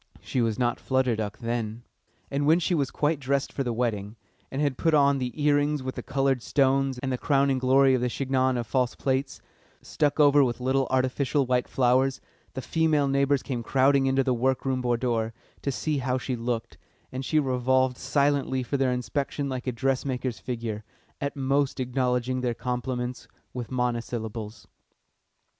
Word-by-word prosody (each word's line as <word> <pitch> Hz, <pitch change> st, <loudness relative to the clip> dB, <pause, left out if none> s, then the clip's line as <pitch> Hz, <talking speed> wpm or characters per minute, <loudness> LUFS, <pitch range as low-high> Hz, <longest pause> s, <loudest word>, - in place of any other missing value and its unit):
She 130 Hz, -, -2 dB
was 115 Hz, -2 st, 0 dB
not 120 Hz, -1 st, 0 dB
Flutter 130 Hz, -3 st, +1 dB
Duck 105 Hz, -1 st, -4 dB
then. 115 Hz, -1 st, -3 dB, 0.5 s
And 145 Hz, +1 st, 0 dB
when 160 Hz, +2 st, +6 dB
she 175 Hz, +1 st, 0 dB
was 140 Hz, -5 st, +1 dB
quite 150 Hz, 0 st, 0 dB
dressed 140 Hz, 0 st, -1 dB
for 135 Hz, -, -1 dB
the 125 Hz, -, -2 dB
wedding, 110 Hz, -3 st, -2 dB, 0.3 s
and 135 Hz, -, -4 dB
had 145 Hz, -3 st, +1 dB
put 160 Hz, +3 st, +2 dB
on 140 Hz, -1 st, +4 dB
the 125 Hz, -1 st, -2 dB
earrings 145 Hz, -1 st, +2 dB
with 130 Hz, 0 st, -3 dB
the -, -, -5 dB
coloured 135 Hz, -2 st, 0 dB
stones 135 Hz, 0 st, +1 dB
and 130 Hz, +1 st, -3 dB
the 125 Hz, -, -2 dB
crowning 140 Hz, -2 st, +2 dB
glory 135 Hz, +1 st, +4 dB
of 130 Hz, -, +1 dB
the 125 Hz, -, +1 dB
chignon 130 Hz, 0 st, 0 dB
of 120 Hz, -, -2 dB
false 125 Hz, +1 st, 0 dB
plaits, 135 Hz, 0 st, -2 dB, 0.4 s
stuck 145 Hz, 0 st, 0 dB
over 145 Hz, -1 st, +6 dB
with 120 Hz, -2 st, -1 dB
little 130 Hz, +1 st, +1 dB
artificial 130 Hz, +2 st, +1 dB
white 125 Hz, 0 st, +1 dB
flowers, 130 Hz, +1 st, +2 dB, 0.4 s
the 130 Hz, -, -4 dB
female 155 Hz, -3 st, +2 dB
neighbours 140 Hz, 0 st, +2 dB
came 125 Hz, -4 st, -3 dB
crowding 135 Hz, +3 st, +3 dB
into 135 Hz, 0 st, +2 dB
the 130 Hz, -1 st, +1 dB
work 130 Hz, +2 st, 0 dB
room 130 Hz, -1 st, 0 dB
boudoir 120 Hz, -2 st, 0 dB, 0.3 s
to 140 Hz, -, -1 dB
see 150 Hz, +2 st, -1 dB
how 130 Hz, 0 st, 0 dB
she 130 Hz, 0 st, -3 dB
looked, 115 Hz, -1 st, -4 dB, 0.3 s
and 130 Hz, +1 st, -4 dB
she 155 Hz, -, 0 dB
revolved 130 Hz, -1 st, +1 dB
silently 140 Hz, -2 st, +1 dB
for 140 Hz, +4 st, -2 dB
their 135 Hz, -1 st, +2 dB
inspection 140 Hz, +3 st, -2 dB
like 130 Hz, -1 st, -5 dB
a -, -, +1 dB
dressmaker's 130 Hz, -1 st, -1 dB
figure, 115 Hz, -4 st, -4 dB, 0.4 s
at 140 Hz, +1 st, -2 dB
most 140 Hz, +1 st, 0 dB
acknowledging 125 Hz, 0 st, 0 dB
their 120 Hz, -2 st, -1 dB
compliments 125 Hz, 0 st, -3 dB, 0.3 s
with 125 Hz, -2 st, -5 dB
monosyllables. 115 Hz, -3 st, -3 dB
130 Hz, 175 wpm, -26 LUFS, 125-140 Hz, 0.5 s, when